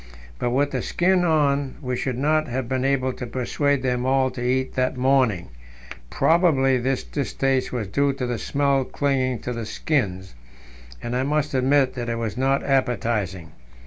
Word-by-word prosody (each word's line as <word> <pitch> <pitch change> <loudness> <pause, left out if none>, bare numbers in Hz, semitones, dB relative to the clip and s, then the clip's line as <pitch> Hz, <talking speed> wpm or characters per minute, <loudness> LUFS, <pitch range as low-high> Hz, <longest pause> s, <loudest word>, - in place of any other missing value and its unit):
But 120 - 0
with 140 +4 +1
the - - -2
skin 180 +1 +2
on 145 -4 +1
we 125 -3 -3
should 125 0 -2
not 155 +3 +1
have 125 0 -3
been 130 0 -1
able 130 -1 +1
to 125 - -6
persuade 130 +3 0
them 125 -1 0
all 130 0 +2
to 125 -1 -6
eat 130 +1 0
that 130 0 0
morning; 125 -8 +2 0.6
probably 140 -7 +3
this 130 +2 -1
distaste 135 -2 -1
was 115 -5 -3
due 140 +8 +1
to 135 -2 -3
the 120 -2 -3
smell 140 -1 +1
clinging 130 -2 0
to 125 - -4
the 115 -2 -5
skins, 95 - -2 0.7
and 120 +1 -3
I 125 - +1
must 150 +2 0
admit 135 +1 +3
that 120 -2 -4
it 115 - -1
was 115 -3 -3
not 135 +2 +1
appetizing. 110 - -1
130 Hz, 175 wpm, -23 LUFS, 125-140 Hz, 0.7 s, probably